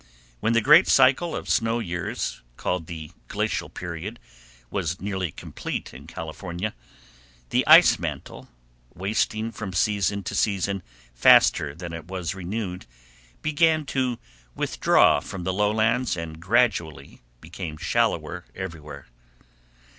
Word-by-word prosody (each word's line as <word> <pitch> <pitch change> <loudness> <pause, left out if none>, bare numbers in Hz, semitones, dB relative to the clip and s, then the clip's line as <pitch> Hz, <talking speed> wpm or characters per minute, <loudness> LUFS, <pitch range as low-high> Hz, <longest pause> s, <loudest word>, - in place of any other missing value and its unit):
When 115 - +1
the 115 - +4
great 150 - +7
cycle 135 +6 +4
of - - -5
snow 115 +1 +1
years, 90 -6 -3 0.2
called 90 -3 -2
the 80 -3 -7 0.2
Glacial - - -2
Period, 90 +6 -6 0.5
was 85 -3 -2
nearly 95 -4 -3
complete - - -6
in - - -12
California, 85 +5 -5 0.8
the - - +3
ice - - +8
mantle, - - -6 0.5
wasting 110 +4 -1
from 105 -5 -6
season 100 +2 +1
to - - -5
season 100 -1 0 0.3
faster 70 +4 +5
than 85 0 -7
it 85 -1 -7
was 90 -3 -3
renewed, 95 0 -5 0.6
began 155 0 +2
to 130 -3 0 0.4
withdraw - - +3
from 95 -2 -7
the 95 - -1
lowlands 110 +3 +1
and 80 -1 -6
gradually 95 - 0 0.2
became 80 0 -7
shallower 90 -3 -1
everywhere. 75 -7 -7
95 Hz, 120 wpm, -25 LUFS, 85-110 Hz, 0.8 s, ice